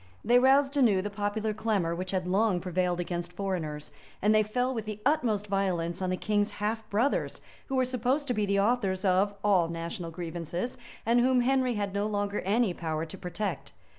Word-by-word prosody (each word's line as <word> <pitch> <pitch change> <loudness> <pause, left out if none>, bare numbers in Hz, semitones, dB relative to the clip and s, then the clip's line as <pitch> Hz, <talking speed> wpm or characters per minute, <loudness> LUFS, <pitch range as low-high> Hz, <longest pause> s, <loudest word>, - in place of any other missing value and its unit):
They 245 +2 +6
roused 270 +2 +4
anew 220 -9 +4
the 205 - -4
popular 210 +1 -1
clamor 205 -6 0
which 185 +2 -4
had 185 -2 -1
long 195 0 +2
prevailed 180 0 -1
against 175 0 -3
foreigners; 175 -6 -4 0.3
and 210 +2 +3
they 215 - +5
fell 245 +5 0
with 225 -3 -4
the 215 -1 -5
utmost 240 -9 +2
violence 185 -3 -1
on 185 - 0
the 185 - 0
king's 205 0 0
half 220 +2 -3
brothers, 230 +8 0 0.3
who 270 - -2
were 260 -1 +3
supposed 255 +4 0
to - - +2
be 210 -2 0
the 200 0 +2
authors 200 -4 +1
of, 195 +2 +2
all 190 -5 +4
national 170 +1 -5
grievances, 170 +6 -4 0.3
and 235 +2 +4
whom 255 +1 +4
Henry 255 -1 +2
had 200 -2 -2
no 200 +1 0
longer 205 -1 -1
any 210 0 +1
power 160 -2 -3
to 160 - -9
protect. 180 -1 -4
205 Hz, 195 wpm, -29 LUFS, 180-230 Hz, 0.3 s, They